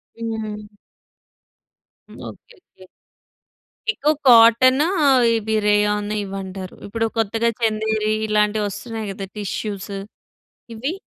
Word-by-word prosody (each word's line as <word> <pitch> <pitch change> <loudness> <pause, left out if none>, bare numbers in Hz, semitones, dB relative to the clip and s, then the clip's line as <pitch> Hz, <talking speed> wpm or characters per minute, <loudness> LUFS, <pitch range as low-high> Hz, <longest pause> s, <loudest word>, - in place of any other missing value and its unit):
హ్మ్. 215 -2 -6 1.3
Okay. 475 - -12
Okay. 190 - -20 1.1
ఎక్కువ 305 -7 +1
కాటనూ, 250 +4 +6 0.5
ఇవి 220 0 -2
రేయాన్ 210 0 +2
ఇవి 195 -1 -6
అంటారు. 190 -1 -8
ఇప్పుడు 225 +2 -2
కొత్తగా 225 +1 +1
చందేరి, 215 -1 0 0.2
ఇలాంటివి 210 0 +1
వస్తున్నాయి 220 +1 -6
కదా! 195 0 -7
టిష్యూస్. 205 0 -5 0.8
ఇవి. 265 +8 -3
215 Hz, 90 wpm, -21 LUFS, 205-230 Hz, 1.3 s, కాటనూ